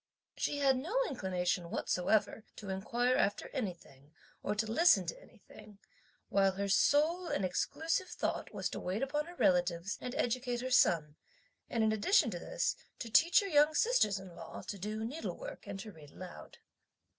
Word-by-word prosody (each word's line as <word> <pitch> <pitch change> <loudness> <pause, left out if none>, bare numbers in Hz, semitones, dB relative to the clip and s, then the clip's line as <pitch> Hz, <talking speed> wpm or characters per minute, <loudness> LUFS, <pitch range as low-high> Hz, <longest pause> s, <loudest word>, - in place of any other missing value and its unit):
She 290 - -1
had 270 -2 +3
no 350 - -3
inclination 180 -6 -2
whatsoever 205 +6 0
to 200 - -8
inquire 240 +6 0
after 205 - 0
anything 160 - -7 0.3
or 210 - -2
to 215 +2 0
listen 320 +11 +4
to - - -6
anything; 210 - -16 0.5
while 195 -1 +3
her 200 +1 -2
sole 310 - +3
and 195 - -1
exclusive 325 - -1
thought - - -3
was - - -2
to - - -5
wait 195 +7 -2
upon 295 +3 -1
her 350 - -10
relatives 180 - +1
and 250 +1 -5
educate 245 0 -1
her 255 +1 -4
son; 160 -10 +3 0.5
and, 230 -2 0
in 220 - +3
addition 220 - +3
to - - -4
this, - - -1 0.2
to 230 - -7
teach 340 - +6
her 400 - -3
young 300 -2 +4
sisters 445 - +3
in 190 -2 -10
law 165 - -9
to 200 - -6
do 215 +3 -3
needlework 325 - -6
and 200 -1 -5
to 215 0 -8
read 155 -5 -14
aloud. 180 +4 -11
220 Hz, 170 wpm, -33 LUFS, 190-290 Hz, 0.5 s, teach